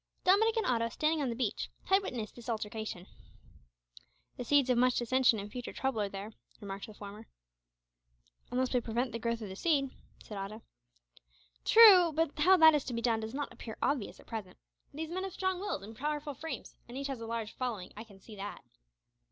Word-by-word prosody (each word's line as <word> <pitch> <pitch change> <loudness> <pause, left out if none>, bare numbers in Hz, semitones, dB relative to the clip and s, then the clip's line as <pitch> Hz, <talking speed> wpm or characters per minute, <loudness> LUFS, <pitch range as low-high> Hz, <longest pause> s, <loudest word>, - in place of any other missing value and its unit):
Dominick 440 +5 +4
and 445 - +1
Otto, 230 -2 +1
standing 310 +5 0
on 270 - 0
the 230 - -2
beach, 235 -4 -2
had 385 +1 +4
witnessed 235 - -5
this 240 0 -9
altercation. 215 -4 -4 1.3
"The - - -5
seeds 270 +1 +3
of 240 - +3
much 250 0 +4
dissension 245 0 +3
and 205 0 -6
future 245 +1 -6
trouble 265 -5 -1
are 200 - -1
there," 200 +3 -7 0.3
remarked 200 0 -6
the 215 - -12
former. 210 +2 -10 1.2
"Unless 255 +1 0
we 250 - +3
prevent 235 +2 -1
the 230 - -4
growth 230 0 -2
of 205 - -6
the 190 - -7
seed," 275 - +1 0.3
said 210 -2 -7
Otto. 210 +3 -6 1.0
"True, 390 -7 +9
but 325 0 +1
how 370 +5 +6
that 320 -2 +8
is 295 -2 +2
to 245 - -4
be 230 - -2
done 230 -2 +2
does 220 +3 -5
not 290 0 -3
appear 220 - -8
obvious 275 -7 -1
at - - -16
present. 215 -5 -7 0.3
These 315 +2 -5
men 370 +2 -2
have 385 -2 -5
strong 375 -1 -1
wills 385 - -3
and 220 +3 -10
powerful 295 +3 -3
frames, 320 +4 -7
and 240 +2 -8
each 275 - -4
has 270 -4 -4
a 225 - -5
large 225 -1 -3
following, 235 -8 -4
I 215 - -7
can 200 -4 -17
see 215 +2 -12
that. 200 +1 -7
245 Hz, 205 wpm, -32 LUFS, 220-295 Hz, 1.3 s, True